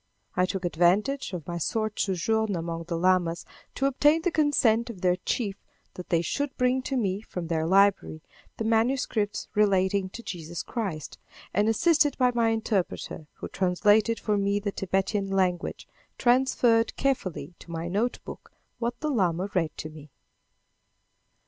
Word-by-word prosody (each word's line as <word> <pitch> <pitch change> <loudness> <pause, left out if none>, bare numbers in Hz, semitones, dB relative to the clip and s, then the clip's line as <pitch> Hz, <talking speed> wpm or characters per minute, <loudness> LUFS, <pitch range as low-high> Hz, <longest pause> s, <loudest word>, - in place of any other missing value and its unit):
I 180 0 +2
took 190 -1 -3
advantage 190 - +1
of 175 -5 -6
my 170 -1 -3
short 215 +5 -2
sojourn 210 +2 0
among 165 0 -4
the 170 -1 -3
lamas 175 -1 +1 0.3
to 270 - 0
obtain 295 +4 +3
the 360 - +1
consent 255 -7 +2
of 200 -6 -8
their 180 -1 +3
chief 200 +1 -2 0.4
that 180 - -9
they 170 -1 +2
should 285 - -2
bring 250 +1 +2
to 265 +1 -2
me, 200 -4 -1
from 180 -5 -6
their 160 -1 -1
library, 195 -4 +3 0.3
the - - -2
manuscripts 225 -2 0
relating 195 -2 +2
to 235 +5 -9
Jesus 170 -3 -6
Christ, 195 - -5 0.3
and, 205 +3 +2
assisted 300 +4 +3
by 250 -2 +3
my 230 -1 +2
interpreter, 210 -8 -2
who - - -7
translated 205 +4 +2
for 210 -1 0
me 200 0 +1
the 205 0 -3
Thibetan 195 +1 -1
language, 185 -2 -1 0.3
transferred 240 -2 +3
carefully 185 - -2
to - - -15
my 165 0 -4
notebook 210 +7 -3 0.3
what 240 +1 -2
the 305 -1 -1
lama 185 - 0
read 165 -4 -1
to 155 - -5
me. 155 -1 -12
200 Hz, 155 wpm, -27 LUFS, 180-235 Hz, 0.4 s, obtain